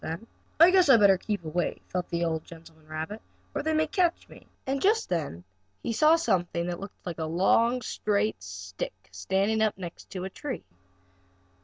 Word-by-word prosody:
"I 335 +3 +9
guess 370 -5 +5
I'd 245 -4 +8
better 195 -3 +6
keep 205 -5 -3
away," 170 +3 -1
thought 180 -1 -3
the 170 0 0
old 160 -1 -1
gentleman 160 -2 -15
rabbit, 160 +8 -5 0.3
"or - - -1
they 315 +1 0
may 315 0 +3
catch 345 +1 0
me." - - -15 0.2
And 270 +1 -1
just 440 +3 +2
then 145 - -2 0.4
he 230 - -1
saw 310 +7 +6
something 175 - 0 0.3
like 175 -3 -5
a 160 - -1
long, 225 +9 +2
straight 210 - 0
stick, 95 0 -7
standing 195 - 0
up 215 -3 +2
against 180 +1 -9
a 185 +1 -3
tree. 275 +2 -5
190 Hz, 165 wpm, -28 LUFS, 165-250 Hz, 0.4 s, I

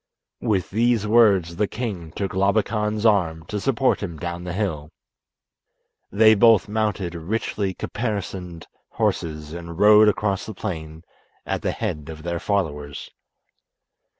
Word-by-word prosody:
With 100 -7 0
these 115 0 +2
words 100 -7 +4
the 105 +1 +1
king 100 -10 -5
took 100 -2 -3
Labakan's 105 +2 0
arm 85 -7 +2
to 105 - -4
support 130 +3 +1
him 85 -6 -5
down 85 +2 -5
the 90 - -4
hill. 85 -7 -3 1.2
They 110 +2 +6
both 110 -1 +5
mounted 105 -4 -1
richly 95 +2 -2
caparisoned 95 -6 -4 0.3
horses 75 -1 -2
and 85 -1 -8
rode 105 +2 +7
across 100 -2 0
the 110 - -7
plain 80 -5 -6 0.4
at - - -2
the - - -1
head 75 +1 -4
of 80 -1 -9
their 85 0 -2
followers. 75 -8 -3
95 Hz, 130 wpm, -23 LUFS, 85-105 Hz, 1.2 s, rode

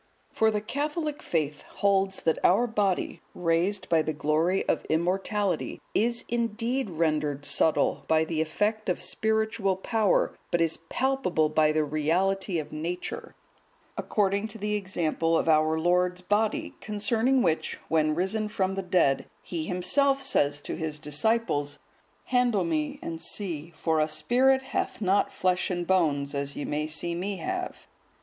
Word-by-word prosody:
For 220 - +3
the 210 -1 -1
Catholic 295 +5 -3
faith 150 -3 -1
holds 195 -1 0
that 160 - 0
our 200 +7 +5
body, 205 -5 -1
raised 175 +4 0
by 165 -1 +3
the 155 0 -2
glory 155 +5 +1
of - - +1
immortality, 185 +2 0
is 235 +2 +1
indeed 235 +1 -1
rendered 155 -4 -1
subtile 160 - +2
by 160 0 +3
the 160 -1 -1
effect 210 +7 -1
of 180 - 0
spiritual 220 -3 0
power, 210 +1 +1
but 175 - +1
is 165 -1 +2
palpable 255 - +1
by 155 0 +3
the 155 0 +1
reality 175 +6 0
of 155 - -4
nature; 170 +4 -5 0.6
according 200 0 0
to 220 - -9
the 210 0 -2
example 165 -4 0
of - - -1
our 155 0 +3
Lord's 180 +2 +1
Body, 205 +4 0
concerning 225 +5 +1
which, 160 -2 0
when 155 -1 +2
risen 200 +5 0
from 190 -2 -1
the 195 - -2
dead, 180 -7 +2 0.2
He 165 -3 -4
Himself 270 - +2
says 145 - +1
to - - -5
His 160 -2 -3
disciples, 150 -1 0 0.5
"Handle 245 -4 +2
Me 305 -3 -1
and 165 -1 -5
see, 170 -3 -4
for 160 0 0
a 155 - +3
spirit 255 +12 +2
hath 265 - -3
not 200 -1 +2
flesh 185 0 0
and 175 -1 -2
bones, 150 -6 +1
as 140 0 -3
ye 150 +1 -2
see 160 +2 -2
Me 190 +3 -3
have." 365 - -4
180 Hz, 150 wpm, -27 LUFS, 160-215 Hz, 0.6 s, our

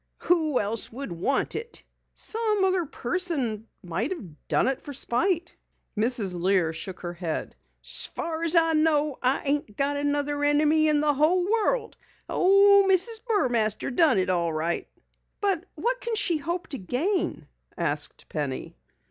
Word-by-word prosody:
"Who 315 -6 +2
else 215 +2 -2
would 270 0 -7
want 170 +11 -1
it?" 470 +1 -7 0.3
"Some 435 -3 0
other 370 -4 0
person 265 - -2 0.2
might 185 - -3
have 190 - -9
done - - +1
it 265 -1 -1
for 285 - -8
spite." 340 +7 0 0.4
Mrs. 215 -5 +1
Lear 180 -3 +2
shook 180 +3 -6
her 175 -1 -5
head. 170 -2 -5 0.3
"So - - +2
far's 330 +1 -1
I 330 -1 +5
know, 305 -2 +1
I 255 +2 +1
ain't 280 -7 -1
got 285 +1 0
another 290 0 -1
enemy 300 +2 +3
in 300 -1 +4
the 300 -1 +3
whole 315 +6 +2
world. 450 +2 0 0.3
Oh, 395 +1 +5
Mrs. 440 +4 +1
Burmaster 245 - +2
done 315 - +5
it 185 0 +1
all 170 -2 0
right." 160 +2 -2 0.5
"But 385 -4 0
what - - -2
can 470 -1 -3
she 395 -6 +1
hope 340 +4 -4
to 275 -5 -4
gain?" 310 - -2 0.3
asked 150 -3 -2
Penny. 140 - -5
290 Hz, 150 wpm, -26 LUFS, 215-355 Hz, 0.5 s, I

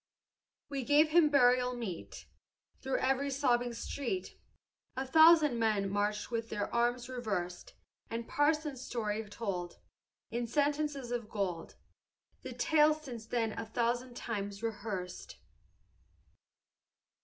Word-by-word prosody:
"We 275 -2 -3
gave 295 +5 +4
him 320 -1 +5
burial 250 -2 +4
meet; 210 -8 -6 0.6
Through 265 0 -1
every 270 +2 +1
sobbing 245 -3 +1
street 285 +9 -4 0.6
A 265 - -1
thousand 315 -3 +6
men 210 -3 +1
marched 210 +3 -1
with 230 -1 -2
their 205 -1 -3
arms 240 +1 +1
reversed; 205 -9 -4 0.3
And 230 0 -4
Parson 300 0 +1
Story 220 -4 -3
told, 190 -5 -4 0.5
In 235 +1 -2
sentences 290 -1 0
of 235 -3 -3
gold, 185 -6 -3 0.7
The - - -7
tale 305 -1 +4
since 250 -8 -9
then 230 -2 0
a - - -4
thousand 240 +2 -1
times 205 -3 -4
rehearsed." 205 -5 -5
240 Hz, 115 wpm, -32 LUFS, 215-280 Hz, 0.7 s, thousand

